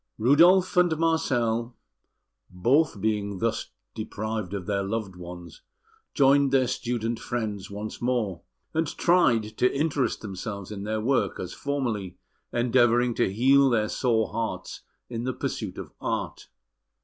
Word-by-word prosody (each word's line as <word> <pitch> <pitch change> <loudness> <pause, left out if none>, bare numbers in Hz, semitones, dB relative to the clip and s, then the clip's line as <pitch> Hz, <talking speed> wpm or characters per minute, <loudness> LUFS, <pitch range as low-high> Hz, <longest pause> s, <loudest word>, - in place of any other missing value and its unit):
Rudolf 170 - +5
and 175 -3 +4
Marcel, 120 -8 0 0.7
both 120 - +2
being 100 -1 -1
thus 115 +4 -1 0.2
deprived 110 -2 -4
of 95 -3 -5
their 100 0 0
loved 100 -1 -3
ones, 90 -2 -10 0.5
joined 140 -1 +4
their 135 -2 +4
student 120 -2 -2
friends 110 -5 -4
once 105 +2 -6
more, 115 -8 -1 0.3
and 160 0 +1
tried 160 -10 +3 0.2
to 125 - +4
interest 140 -4 0
themselves 100 0 -6
in 100 -1 -6
their 110 +1 -1
work 115 -5 0
as 90 - -5
formerly, 115 -11 -3 0.3
endeavouring 120 0 +3
to 95 - +1
heal 135 +6 +5
their 110 -3 +1
sore 115 -4 +1
hearts 115 -1 -4 0.3
in 115 -1 -4
the 130 +1 -1
pursuit - - -4
of - - -7
art. - - -3
115 Hz, 135 wpm, -26 LUFS, 105-130 Hz, 0.7 s, Rudolf